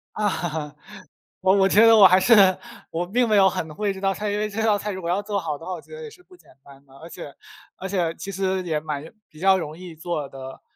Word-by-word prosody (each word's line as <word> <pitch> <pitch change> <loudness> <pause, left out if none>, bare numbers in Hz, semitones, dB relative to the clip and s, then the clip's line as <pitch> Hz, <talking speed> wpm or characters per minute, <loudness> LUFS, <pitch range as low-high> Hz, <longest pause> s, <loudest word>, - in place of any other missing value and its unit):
啊， 160 -7 -3 0.7
我 190 +1 +3
我 195 - +4
觉 220 +4 +5
得 225 0 +7
我 200 -3 +9
还 185 +1 +5
是 230 +4 +5 0.6
我 175 +2 -3
并 240 +5 +1
没 210 - +3
有 190 -1 +6
很 160 -4 -5
会 205 +1 -1
这 190 - -9
道 195 0 +1
菜， 210 +1 -4
因 205 - -2
为 210 0 -1
这 220 +2 -4
道 215 -2 +3
菜 210 +1 -4
如 190 - -5
果 170 - -5
要 190 +3 0
做 205 -1 -2
好 155 -3 -4
的 165 - -12
话， 185 - -5
我 180 - -5
觉 - - -14
得 475 - -9
也 455 - -8
是 365 - -18
不 365 0 -19
简 - - -24
单 140 0 -17
的。 135 - -21
而 165 - -11
且 145 - -10 0.4
而 190 - -6
且 175 -4 -1
其 195 - -7
实 190 0 -2
也 160 -3 -1
蛮 150 -2 -5 0.3
比 155 - -16
较 190 0 +4
容 155 -2 -6
易 180 -2 -10
做 160 -3 -4
得 135 0 -10
190 Hz, 290 characters per minute, -23 LUFS, 160-205 Hz, 0.7 s, 我